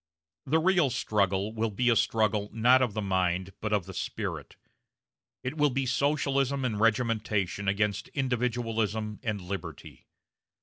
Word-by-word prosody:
The 155 +5 +3
real 175 -3 +3
struggle 100 -2 0
will 115 0 -1
be 115 +4 -1
a - - +4
struggle 110 -2 +1
not 125 +4 +4
of 120 -5 0
the 110 - -1
mind 95 -1 0
but 110 - -2
of 105 -5 +1
the 95 - -9
spirit; - - -5 0.9
it 130 +5 -4
will 150 0 +4
be 135 0 -1
Socialism 140 0 +1
and 110 -4 -1
regimentation 110 -4 0
against 105 +1 0
individualism 115 -5 -1
and 110 -4 -2
liberty. 90 -3 -7
110 Hz, 140 wpm, -28 LUFS, 100-125 Hz, 0.9 s, a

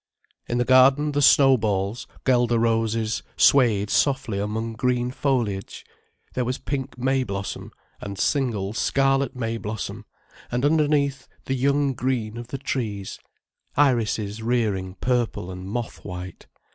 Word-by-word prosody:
In 120 - -1
the 120 - +1
garden 135 +4 +5
the 145 0 0
snowballs, 115 -7 +3 0.2
guelder 120 -2 +3
roses, 115 -1 0 0.2
swayed 110 -7 +4
softly 130 -7 +1
among 110 +3 -3
green 125 +1 0
foliage, 120 -8 -2 0.5
there 125 - 0
was 125 +1 -2
pink 135 -2 -4
may 130 +1 +1
blossom, 100 -3 -5 0.3
and 100 -1 -7
single 110 -5 0
scarlet 135 +2 +1
may 115 -2 -2
blossom, 110 0 -5 0.5
and 125 +3 0
underneath 145 -3 +1 0.2
the 135 - -1
young 140 +1 +1
green 120 -4 -2
of 120 0 -7
the 135 - -5
trees, 110 -7 -4 0.6
irises 115 -6 +1
rearing 105 -6 -1
purple 120 -7 -1
and 90 +1 -7
moth 120 +1 -5
white. 90 +1 -8
120 Hz, 130 wpm, -24 LUFS, 105-135 Hz, 0.6 s, garden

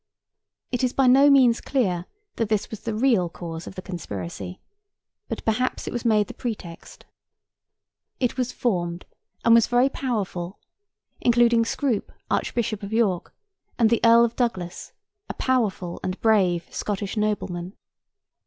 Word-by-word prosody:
It 245 0 -1
is 250 - +1
by 270 - +3
no 270 +3 +7
means 255 -4 +5
clear 185 -10 0 0.3
that 225 -3 0
this 215 -1 0
was 220 - -6
the 225 -2 -4
real 220 -7 +2
cause 165 -1 -7
of - - -9
the 185 - -7
conspiracy; 95 - -6 0.7
but - - -5
perhaps 245 +3 0
it - - -5
was 240 - -3
made 215 -2 +4
the - - -9
pretext. 205 -8 -7 1.1
It 250 -1 0
was 250 -1 -1
formed, 175 -7 -2 0.4
and 230 - +7
was 230 -1 +6
very 245 +2 +3
powerful; 200 -9 -3 0.6
including 235 -1 +4
Scroop, 235 -2 -1 0.2
Archbishop 215 -3 -1
of 200 0 -7
York, 215 -6 +1 0.5
and 230 -2 +4
the 235 - +2
Earl 230 0 +7
of 235 - -4
Douglas, 190 -8 -2 0.4
a - - -4
powerful 210 -9 -1
and 185 +1 -3
brave 190 -6 +3
Scottish 205 0 -3
nobleman. 200 -4 -2
220 Hz, 145 wpm, -24 LUFS, 185-240 Hz, 1.1 s, no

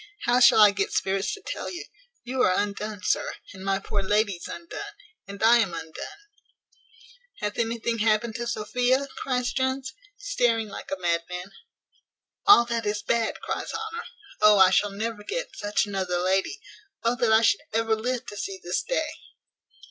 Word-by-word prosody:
how 245 +1 +4
shall 245 - +7
I 210 -1 +8
get 200 0 -1
spirits 195 +1 0
to 405 - -15
tell - - -4
you; 350 - -6 0.4
you 255 +1 -2
are 185 -6 +4
undone, 205 0 -3
sir, - - 0 0.2
and 190 -1 -10
my 195 0 +1
poor 200 +1 -2
lady's 200 -2 0
undone, 340 0 -7 0.3
and 200 +1 -7
I 235 +2 +7
am 225 -7 +1
undone." 160 -1 -7 1.2
"Hath 210 0 -3
anything 230 0 -1
happened 220 +1 +2
to 235 0 -4
Sophia?" 245 +4 +1
cries 250 -2 -1
Jones, 265 0 -1 0.2
staring 240 - 0
like - - -8
a 195 - -3
madman. 175 +2 -2 1.0
"All 320 -13 +8
that 230 -2 -2
is 205 0 -1
bad," 230 -1 0
cries - - -4
Honour: 445 0 -5 0.4
"Oh, 210 -1 +7
I 190 -1 +7
shall 205 +2 +3
never 210 +1 -4
get - - -4
such 205 0 0
another 190 -3 -2
lady! 190 - 0 0.4
Oh 235 +1 +2
that 240 -2 +2
I 220 0 +6
should - - +3
ever 225 0 +1
live 245 +2 -2
to 205 -3 -8
see 195 -1 -4
this 175 +1 -1
day!" - - -1
220 Hz, 170 wpm, -26 LUFS, 195-245 Hz, 1.2 s, I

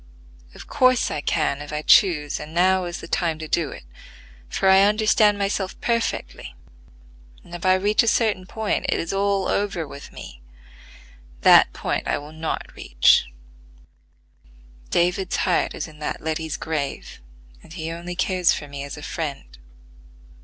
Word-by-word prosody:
Of - - -11
course 255 -3 +2
I 145 - -3
can 140 0 -1
if 145 - -8
I 150 0 -3
choose, 150 -7 +4
and 155 +2 -9
now 185 +1 +3
is 175 0 -6
the - - -9
time 165 -3 -1
to 155 0 -7
do 155 -2 0
it; - - -10 0.7
for 190 - 0
I 190 0 +7
understand 210 0 +3
myself 195 -1 -2
perfectly, 230 -1 -3 0.9
and 175 - -15
if 175 - -7
I 185 - +5
reach 205 +3 +2
a 230 - -2
certain 215 -5 +1
point 220 +2 -2
it - - +1
is 165 - -3
all 195 -1 0
over 195 -6 -1
with 140 0 -11
me. - - -11 1.0
That - - +7
point - - -3
I - - 0
will 145 +2 -10
not 160 0 -4
reach: 60 0 +3 1.6
David's 180 +2 0
heart 180 - 0
is - - -5
in 155 -1 -15
that 150 - -4
Letty's 160 -1 -3
grave, 150 - -5 0.4
and - - -17
he 165 -1 -5
only 175 +1 -6
cares 185 -1 +2
for 145 - -6
me 140 -1 -7
as 140 - -7
a 150 - -10
friend. 140 - -5
175 Hz, 160 wpm, -23 LUFS, 150-195 Hz, 1.6 s, I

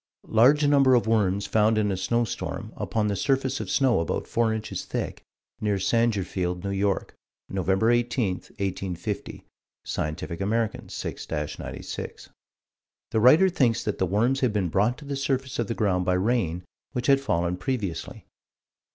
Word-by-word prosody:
Large 135 +7 +5
number 140 -3 +5
of 120 - +2
worms 100 -3 +1
found 110 0 +3
in 105 -1 +2
a - - 0
snowstorm, 115 +5 -2
upon 110 -2 -1
the 105 -1 0
surface 135 +3 0
of - - -5
snow 130 -7 +3
about 85 - -2
four 115 -1 +1
inches 110 -1 -4
thick, - - -4 0.4
near 105 -2 0
Sangerfield, 95 -5 0
N.Y., 100 0 +1 0.6
Nov. 95 -1 -3
18, 120 -3 +2
1850 95 0 -5 0.4
(Scientific 85 +3 -3
American, 110 +2 -1
6 - - -6
96). 75 0 -5 0.8
The 110 - +2
writer 150 - +7
thinks 130 -10 +1
that 105 - -3
the 95 - +2
worms 115 +9 +2
had 125 -4 +2
been 100 -4 0
brought 105 +8 +1
to 150 - -12
the 140 0 -3
surface 135 -1 -2
of 115 - 0
the 115 - -2
ground 95 -4 +1
by 90 - +2
rain, 90 -4 0 0.3
which 125 -1 -2
had 135 0 +4
fallen 90 -8 0
previously. 100 -2 -4
110 Hz, 150 wpm, -26 LUFS, 95-125 Hz, 0.8 s, writer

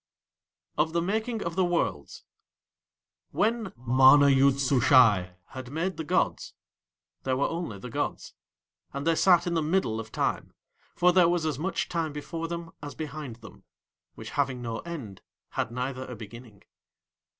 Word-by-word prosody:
OF 160 +1 +1
THE 170 - +1
MAKING 220 +4 -2
OF 170 0 -4
THE 190 - +2
WORLDS 175 -1 -2 1.1
When 220 -2 0
MANA 130 +4 +6
YOOD 135 0 +4
SUSHAI 125 -9 +4
had 130 -2 -8
made 165 +6 -3
the 160 - -3
gods 150 - -1 0.7
there 130 -1 -1
were 140 - +1
only 165 - -4
the 120 +5 -9
gods, - - -3 0.6
and 140 +1 -4
They 165 - +3
sat 175 +1 +4
in 175 - -1
the 165 - +1
middle 155 -8 0
of 110 0 -8
Time, - - -2 0.4
for 180 0 +4
there 175 -2 +5
was 175 -2 0
as 150 -4 -2
much 185 +5 -2
Time 165 -3 -2
before 165 +3 -5
them 170 0 -6
as 145 -1 -8
behind 150 -5 -6
them, 110 - -14 0.5
which 110 +1 -9
having 135 -3 -1
no 115 -2 -4
end 130 - -8 0.3
had - - -2
neither 130 +2 -4
a 125 - -7
beginning. 110 -1 -12
145 Hz, 160 wpm, -27 LUFS, 125-170 Hz, 1.1 s, MANA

